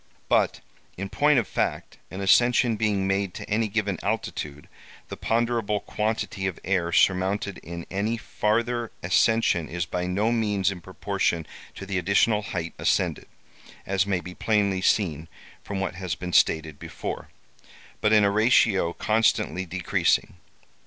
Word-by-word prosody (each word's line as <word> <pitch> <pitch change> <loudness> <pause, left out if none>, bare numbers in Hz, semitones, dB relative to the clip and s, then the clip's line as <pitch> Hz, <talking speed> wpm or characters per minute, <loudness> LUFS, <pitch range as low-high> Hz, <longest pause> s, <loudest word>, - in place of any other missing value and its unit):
"But, - - +2 0.4
in 100 +1 -4
point 145 +4 +3
of 120 - +1
fact, - - -2
an 95 - -6
ascension 120 +4 +4
being 105 -3 0
made 95 -1 -1
to - - -7
any 110 +1 +1
given 100 -3 -1
altitude, 75 0 -4 0.4
the - - -5
ponderable 115 -2 0
quantity 105 -2 -2
of 95 - -5
air 90 -2 0
surmounted 95 +3 +1
in 85 0 -8
any 105 +5 -1
farther 115 +2 -1
ascension 90 -1 +2
is 85 +1 -2
by 90 +1 -3
no 105 +5 +1
means 105 -4 +1
in 90 -2 -8
proportion 95 -2 -2 0.3
to - - -7
the 95 -1 -1
additional 100 +4 +2
height 85 -5 -4
ascended - - 0 0.6
(as 95 0 +1
may 95 -3 0
be 90 +2 -9
plainly 100 -2 +1
seen 80 -7 +1 0.4
from 100 -1 -4
what 95 - -2
has 95 -2 -4
been 90 -1 -6
stated 80 -2 +2
before), - - -6 0.7
but 105 - +3
in 105 -1 +6
a 100 - +3
ratio 105 -5 +3
constantly 110 -4 +1
decreasing. 90 0 0
100 Hz, 145 wpm, -25 LUFS, 90-110 Hz, 0.7 s, in